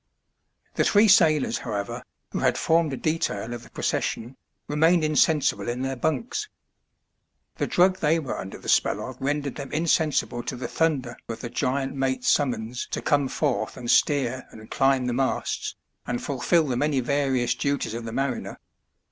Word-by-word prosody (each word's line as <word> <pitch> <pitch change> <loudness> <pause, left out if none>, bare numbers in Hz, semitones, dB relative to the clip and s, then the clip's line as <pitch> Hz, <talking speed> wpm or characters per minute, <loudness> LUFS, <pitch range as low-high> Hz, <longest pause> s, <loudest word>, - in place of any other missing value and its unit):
The - - +2
three 210 +2 +5
sailors, 155 -7 +4
however, 105 -3 -4 0.3
who - - -2
had - - +2
formed 165 -2 +2
a 135 - -3
detail 120 -9 -1
of 120 - -6
the - - -15
procession 120 +4 -2 0.3
remained 160 +3 +3
insensible 155 -4 +2
in 125 +2 -2
their 135 0 -2
bunks. 230 - -2 1.1
The - - -1
drug 185 +1 +3
they 155 +2 +3
were 150 -6 -3
under 95 - -7
the - - -12
spell - - +2
of 130 -1 -10
rendered 145 0 -1
them 140 -1 -7
insensible 155 -6 +1
to 120 - -5
the 125 - -4
thunder 135 -7 0
of 115 - -5
the 120 - -6
giant 135 +1 -1
mate*s 130 -2 -1
summons 125 -3 0
to - - -3
come 145 -2 +2
forth 125 -6 -1
and 120 -1 -1
steer 130 -3 +2
and 110 0 -13
climb 135 -1 +2
the 125 - -1
masts, 135 +2 -1 0.3
and 120 0 -1
fulfil 150 +5 +1
the 130 -4 -1
many 145 0 +1
various 130 -2 +1
duties 140 -2 -1
of 115 0 -5
the 115 - -5
mariner. 135 0 -2
135 Hz, 170 wpm, -25 LUFS, 125-155 Hz, 1.1 s, three